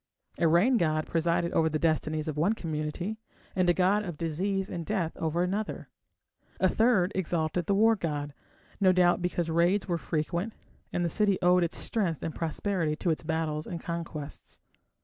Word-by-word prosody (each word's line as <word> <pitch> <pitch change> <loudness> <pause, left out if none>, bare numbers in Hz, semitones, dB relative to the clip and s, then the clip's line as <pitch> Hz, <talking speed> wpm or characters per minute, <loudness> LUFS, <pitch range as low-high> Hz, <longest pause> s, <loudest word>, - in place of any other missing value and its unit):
A 170 - +4
rain 190 +11 +4
god 155 -4 +1
presided 170 +1 0
over 160 0 +2
the 155 - -1
destinies 155 -1 0
of 155 - -2
one 170 +8 +2
community, 165 +3 -4 0.4
and 185 -2 +2
a - - +5
god 195 +3 +3
of 175 -6 -6
disease 190 +5 -1
and 170 -2 -5
death 175 -3 -2
over 165 +2 0
another; 200 +4 -3 0.7
a 190 - +4
third 210 -3 +3
exalted 170 -2 -1
the 200 - +2
war 225 +2 +5
god, 145 -6 -3 0.5
no 190 -2 +5
doubt 180 0 +3
because 175 -1 -1
raids 175 +5 +2
were 170 -2 -1
frequent 170 +7 -2 0.4
and 175 - 0
the - - +2
city 200 +2 +2
owed 180 0 +5
its 170 - -2
strength 185 - -1
and 160 - -3
prosperity 165 -1 -1
to 170 +2 0
its 155 - -1
battles 160 -1 -2
and 170 - -5
conquests. 165 -3 -6
170 Hz, 175 wpm, -29 LUFS, 160-190 Hz, 0.7 s, a